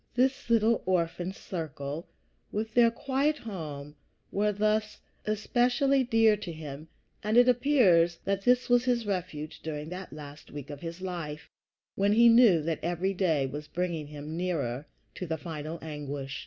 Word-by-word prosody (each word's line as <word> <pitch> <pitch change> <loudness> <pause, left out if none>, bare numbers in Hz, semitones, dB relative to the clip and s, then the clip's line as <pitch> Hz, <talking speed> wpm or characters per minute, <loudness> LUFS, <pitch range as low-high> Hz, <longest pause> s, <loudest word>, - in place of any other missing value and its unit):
This 260 0 +1
little 230 0 +3
orphan 175 0 0
circle, 160 -4 -6 0.4
with 220 +1 -3
their 235 -1 +6
quiet 275 +5 0
home, 150 - -7 0.4
were 210 +1 +1
thus 215 +1 0 0.3
especially 245 +5 +2
dear 225 -3 +4
to 195 -4 -6
him, 155 -1 -8 0.4
and 215 +3 +1
it 245 +1 +7
appears 225 - +4
that 195 0 0
this 250 +4 +3
was 245 0 +4
his 240 -3 +1
refuge 175 -6 -4
during 155 -1 -5
that 180 +1 -7
last 150 0 -10
week 145 0 -8
of 145 - -8
his 170 +1 -6
life, 170 -5 -5 0.4
when 200 +1 +2
he 235 +2 +7
knew 230 -9 +6
that 160 0 -1
every 175 +3 -1
day 165 -7 +1
was 145 +3 -6
bringing 170 -2 -3
him 150 +1 -7
nearer 150 -7 -2 0.3
to 180 - -6
the 160 0 -2
final 155 0 -6
anguish. 145 -2 -5
180 Hz, 155 wpm, -29 LUFS, 155-225 Hz, 0.4 s, it